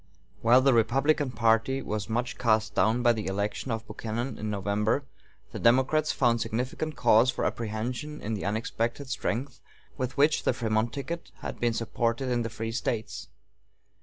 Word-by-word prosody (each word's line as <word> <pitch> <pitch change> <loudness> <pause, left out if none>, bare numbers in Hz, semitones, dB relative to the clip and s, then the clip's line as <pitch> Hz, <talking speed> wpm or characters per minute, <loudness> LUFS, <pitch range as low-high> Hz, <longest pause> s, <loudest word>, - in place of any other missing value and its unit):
While 120 +4 +6
the 135 0 +4
Republican 135 +6 +2
party 115 +2 +2
was 105 -1 -3
much 120 +2 -2
cast 110 -3 +2
down 115 +4 +2
by 120 -1 +5
the 110 -2 -4
election 100 +6 -2
of 115 -1 -3
Buchanan 115 +3 -4
in 110 - -3
November, 105 +6 0 0.5
the - - -6
Democrats 130 +6 +3
found 120 -3 +2
significant 130 +8 -3
cause 120 0 +5
for - - -1
apprehension 120 +7 -3
in 110 - -4
the 105 - -3
unexpected 115 +5 -2
strength 130 +1 -3 0.4
with 130 0 -3
which 150 +2 +4
the - - +1
Frémont 115 -1 0
ticket 155 +5 -5
had - - -6
been 120 -1 +1
supported 115 +3 -1
in 120 -1 +1
the 115 - -2
free 110 +1 -4
States. 115 0 -3
115 Hz, 165 wpm, -28 LUFS, 110-130 Hz, 0.5 s, While